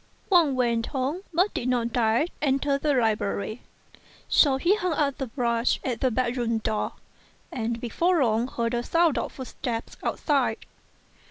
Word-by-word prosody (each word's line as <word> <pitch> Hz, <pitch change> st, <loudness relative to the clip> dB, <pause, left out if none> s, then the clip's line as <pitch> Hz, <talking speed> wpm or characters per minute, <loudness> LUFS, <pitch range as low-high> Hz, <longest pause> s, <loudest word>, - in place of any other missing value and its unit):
Wang 330 Hz, -7 st, +5 dB
went 235 Hz, -2 st, +1 dB
home, 275 Hz, +7 st, -2 dB
but 360 Hz, +5 st, +2 dB
did 245 Hz, -, -2 dB
not 235 Hz, -2 st, 0 dB
dare 235 Hz, +3 st, +2 dB, 0.2 s
enter 275 Hz, 0 st, +1 dB
the 290 Hz, -1 st, +1 dB
library; 215 Hz, -1 st, 0 dB, 0.7 s
so 275 Hz, -3 st, +4 dB
he 345 Hz, +9 st, +3 dB
hung 365 Hz, -5 st, -1 dB
up 285 Hz, -3 st, 0 dB
the 270 Hz, -, -2 dB
brush 235 Hz, -1 st, 0 dB
at 250 Hz, -4 st, -3 dB
the 260 Hz, -, +3 dB
bedroom 240 Hz, -1 st, 0 dB
door, 215 Hz, -1 st, -2 dB, 0.6 s
and 235 Hz, -1 st, -2 dB
before 335 Hz, +7 st, +1 dB
long 230 Hz, 0 st, +1 dB
heard 235 Hz, -2 st, -2 dB
a 240 Hz, -, 0 dB
sound 335 Hz, +3 st, +2 dB
of -, -, -4 dB
footsteps 245 Hz, -3 st, -5 dB
outside. 270 Hz, -7 st, 0 dB
255 Hz, 155 wpm, -26 LUFS, 230-285 Hz, 0.7 s, Wang